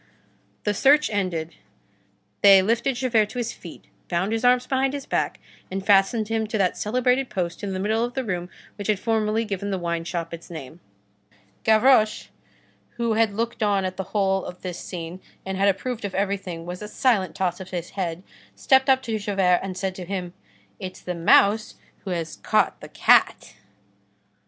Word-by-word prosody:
The 210 Hz, -, +1 dB
search 285 Hz, +7 st, +4 dB
ended, 175 Hz, -5 st, -2 dB, 0.9 s
they 195 Hz, -1 st, +8 dB
lifted 235 Hz, +5 st, +1 dB
Javert 235 Hz, -4 st, +1 dB
to 250 Hz, -, -9 dB
his 240 Hz, -1 st, -2 dB
feet, 170 Hz, -, -12 dB, 0.2 s
bound 185 Hz, +4 st, 0 dB
his 225 Hz, +1 st, -2 dB
arms 250 Hz, 0 st, +4 dB
behind 265 Hz, +1 st, 0 dB
his 280 Hz, -, -6 dB
back, -, -, -1 dB, 0.3 s
and 190 Hz, +1 st, -4 dB
fastened 205 Hz, +2 st, +3 dB
him 225 Hz, 0 st, -1 dB
to 220 Hz, -, -2 dB
that 190 Hz, -3 st, +1 dB
celebrated 250 Hz, +4 st, +1 dB
post 175 Hz, -3 st, -3 dB
in 200 Hz, -, -2 dB
the 185 Hz, -, -3 dB
middle 220 Hz, +4 st, +1 dB
of 245 Hz, 0 st, -4 dB
the 265 Hz, -, -1 dB
room 180 Hz, -5 st, -3 dB, 0.3 s
which 205 Hz, -, -5 dB
had 215 Hz, -2 st, +2 dB
formerly 220 Hz, 0 st, 0 dB
given 200 Hz, -1 st, -4 dB
the 195 Hz, -, -1 dB
wine 170 Hz, -1 st, -2 dB
shop 170 Hz, -1 st, -4 dB
its 170 Hz, 0 st, -9 dB
name. 160 Hz, -1 st, -9 dB, 0.8 s
Gavroche, 220 Hz, 0 st, +4 dB, 0.7 s
who 235 Hz, -1 st, 0 dB
had 220 Hz, -2 st, +2 dB
looked 230 Hz, +1 st, -3 dB
on 200 Hz, -2 st, +2 dB
at 185 Hz, 0 st, -4 dB
the 190 Hz, -, -3 dB
whole 195 Hz, -2 st, +1 dB
of 180 Hz, -, -9 dB
this 180 Hz, -2 st, -5 dB
scene 175 Hz, +1 st, -7 dB, 0.2 s
and 190 Hz, 0 st, -3 dB
had 200 Hz, +1 st, +3 dB
approved 235 Hz, +4 st, -3 dB
of 200 Hz, -, -4 dB
everything 190 Hz, -4 st, -2 dB
with 180 Hz, +2 st, -6 dB
a 210 Hz, -, -5 dB
silent 210 Hz, -, +1 dB
toss 185 Hz, -1 st, -1 dB
of 190 Hz, -1 st, -8 dB
his 175 Hz, -2 st, -5 dB
head, 180 Hz, -2 st, -4 dB, 0.3 s
stepped 265 Hz, 0 st, +3 dB
up 265 Hz, 0 st, +4 dB
to 225 Hz, -3 st, -2 dB
Javert 195 Hz, -3 st, +2 dB
and 190 Hz, -1 st, -5 dB
said 190 Hz, 0 st, -2 dB
to 185 Hz, -1 st, -8 dB
him:— 180 Hz, -1 st, -4 dB, 0.5 s
"It's 185 Hz, 0 st, -7 dB
the 180 Hz, -, -4 dB
mouse 200 Hz, +5 st, +4 dB, 0.3 s
who -, -, -4 dB
has 170 Hz, -3 st, -3 dB
caught -, -, +1 dB
the -, -, -10 dB
cat." -, -, +3 dB
200 Hz, 185 wpm, -24 LUFS, 180-225 Hz, 0.9 s, they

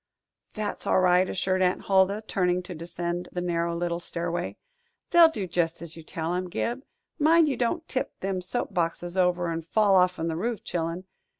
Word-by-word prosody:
"That's 215 Hz, -2 st, -4 dB
all -, -, +4 dB
right," 185 Hz, 0 st, +4 dB
assured 185 Hz, 0 st, 0 dB
Aunt 180 Hz, 0 st, +1 dB
Huldah, 195 Hz, +2 st, +3 dB
turning 180 Hz, -2 st, +1 dB
to 180 Hz, -, -7 dB
descend 175 Hz, +1 st, -4 dB
the 180 Hz, -, -3 dB
narrow 170 Hz, -1 st, -1 dB
little 170 Hz, 0 st, -2 dB
stairway. 175 Hz, 0 st, -4 dB, 0.5 s
"They'll 340 Hz, -2 st, +8 dB
do 210 Hz, -11 st, -3 dB
jest 170 Hz, -1 st, -1 dB
as 165 Hz, -1 st, -9 dB
you 165 Hz, -, -9 dB
tell 165 Hz, +1 st, -4 dB
'em, 180 Hz, 0 st, -2 dB
Gib. 235 Hz, +7 st, -2 dB, 0.4 s
Mind 320 Hz, +2 st, +5 dB
you 280 Hz, -, 0 dB
don't 320 Hz, +7 st, -1 dB
tip 260 Hz, -, -3 dB
them 190 Hz, -1 st, -2 dB
soap 205 Hz, +3 st, -3 dB
boxes 175 Hz, 0 st, -2 dB
over 180 Hz, -2 st, +2 dB
an' 165 Hz, 0 st, -2 dB
fall 200 Hz, +5 st, +2 dB
off'n 180 Hz, -3 st, +3 dB
the 165 Hz, -, -2 dB
roof, 220 Hz, +4 st, -2 dB
chil'en. 170 Hz, +1 st, -3 dB
180 Hz, 185 wpm, -27 LUFS, 170-200 Hz, 0.5 s, They'll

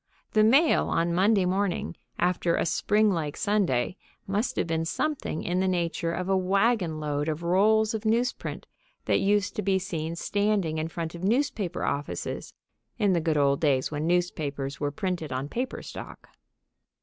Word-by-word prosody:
The 215 Hz, -, +4 dB
mail 275 Hz, +9 st, +4 dB
on 170 Hz, +1 st, +1 dB
Monday 195 Hz, +2 st, +3 dB
morning, 185 Hz, -1 st, -1 dB, 0.2 s
after 175 Hz, -1 st, +1 dB
a -, -, 0 dB
springlike 170 Hz, -3 st, +1 dB
Sunday, 195 Hz, -, +1 dB, 0.3 s
must 215 Hz, +6 st, -1 dB
have -, -, 0 dB
been 165 Hz, -1 st, -1 dB
something 220 Hz, -, -2 dB
in 180 Hz, +1 st, 0 dB
the 190 Hz, -, +1 dB
nature 170 Hz, -2 st, -1 dB
of 180 Hz, +2 st, -3 dB
a 195 Hz, -, +2 dB
wagon 190 Hz, -2 st, +1 dB
load 150 Hz, 0 st, -1 dB
of 155 Hz, +2 st, -3 dB
rolls 215 Hz, +5 st, +3 dB
of 220 Hz, -1 st, -3 dB
news 230 Hz, +3 st, +2 dB
print -, -, -7 dB, 0.4 s
that -, -, +2 dB
used 205 Hz, 0 st, +1 dB
to -, -, +1 dB
be 195 Hz, -1 st, +2 dB
seen 170 Hz, -4 st, -3 dB
standing 200 Hz, -4 st, 0 dB
in 155 Hz, -, -1 dB
front 165 Hz, -1 st, -5 dB
of 170 Hz, +1 st, -8 dB
newspaper 220 Hz, -, 0 dB
offices 145 Hz, +1 st, -3 dB, 0.4 s
in 205 Hz, -4 st, +3 dB
the 170 Hz, -, +2 dB
good 155 Hz, -1 st, +1 dB
old 140 Hz, -1 st, +2 dB
days 135 Hz, -4 st, +2 dB
when 150 Hz, +1 st, -2 dB
newspapers 145 Hz, -6 st, -1 dB
were 145 Hz, -, 0 dB
printed 180 Hz, -2 st, -3 dB
on 130 Hz, +2 st, -2 dB
paper 250 Hz, -, -4 dB
stock. -, -, -9 dB
180 Hz, 170 wpm, -27 LUFS, 160-205 Hz, 0.4 s, The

